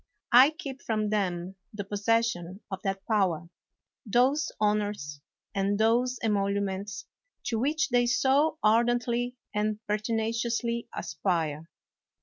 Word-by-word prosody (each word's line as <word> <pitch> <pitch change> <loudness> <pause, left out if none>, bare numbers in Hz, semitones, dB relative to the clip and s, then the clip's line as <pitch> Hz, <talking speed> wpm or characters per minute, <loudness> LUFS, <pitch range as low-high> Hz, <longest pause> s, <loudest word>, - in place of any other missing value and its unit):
I 255 +3 +9
keep 295 -4 -8
from 215 -2 -1
them 185 -2 -1
the 210 -1 -5
possession 205 -2 0
of 190 -1 -4
that 195 -1 -3
power, 180 -7 +1 0.5
those 260 +6 +2
honors, 205 -9 -1 0.3
and 200 0 +1
those 240 +3 +2
emoluments, 200 -1 -1 0.4
to 230 -2 -1
which 305 +5 +1
they 245 -1 +3
so 275 +5 +3
ardently 240 +2 +2 0.2
and 210 0 0
pertinaciously 230 +2 -1
aspire. 165 -2 -2
215 Hz, 110 wpm, -28 LUFS, 195-240 Hz, 0.5 s, I